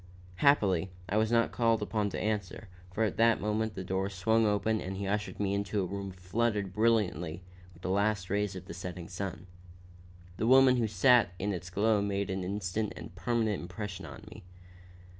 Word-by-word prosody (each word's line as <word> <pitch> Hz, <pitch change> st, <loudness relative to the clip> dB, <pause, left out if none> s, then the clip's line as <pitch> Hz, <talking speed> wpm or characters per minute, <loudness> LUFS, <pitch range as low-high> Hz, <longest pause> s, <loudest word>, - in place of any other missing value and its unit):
Happily, 100 Hz, -, +3 dB, 0.2 s
I 100 Hz, -, 0 dB
was 110 Hz, +1 st, +2 dB
not 115 Hz, -1 st, +3 dB
called 115 Hz, -2 st, +2 dB
upon 105 Hz, -2 st, -1 dB
to -, -, -4 dB
answer, 105 Hz, -1 st, -3 dB, 0.2 s
for 110 Hz, +4 st, 0 dB
at 105 Hz, -2 st, -1 dB
that 115 Hz, 0 st, +4 dB
moment 105 Hz, +1 st, -1 dB
the 95 Hz, -, -4 dB
door 95 Hz, +1 st, -1 dB
swung 110 Hz, +4 st, +2 dB
open 105 Hz, +1 st, +1 dB
and 95 Hz, +1 st, -5 dB
he 100 Hz, -, -3 dB
ushered 105 Hz, +1 st, -2 dB
me 100 Hz, -1 st, 0 dB
into 100 Hz, +1 st, -1 dB
a 95 Hz, -, 0 dB
room 100 Hz, +1 st, -5 dB
flooded 100 Hz, +2 st, -1 dB
brilliantly 95 Hz, -7 st, +1 dB, 0.3 s
with 85 Hz, 0 st, -19 dB
the 95 Hz, -, -1 dB
last 100 Hz, -1 st, +1 dB
rays 100 Hz, 0 st, -1 dB
of 95 Hz, -, -8 dB
the -, -, -8 dB
setting 90 Hz, 0 st, -7 dB
sun. 95 Hz, -1 st, -5 dB, 0.9 s
The 110 Hz, -, 0 dB
woman 130 Hz, 0 st, +7 dB
who 115 Hz, -2 st, +1 dB
sat 105 Hz, -1 st, +4 dB
in 100 Hz, +2 st, -1 dB
its 90 Hz, -1 st, -6 dB
glow 105 Hz, +3 st, +2 dB
made 100 Hz, -1 st, -1 dB
an 95 Hz, 0 st, -2 dB
instant 100 Hz, +2 st, -2 dB
and -, -, -9 dB
permanent 110 Hz, +2 st, 0 dB
impression 95 Hz, +2 st, -6 dB
upon -, -, -10 dB
me. -, -, -11 dB
100 Hz, 190 wpm, -30 LUFS, 95-110 Hz, 0.9 s, woman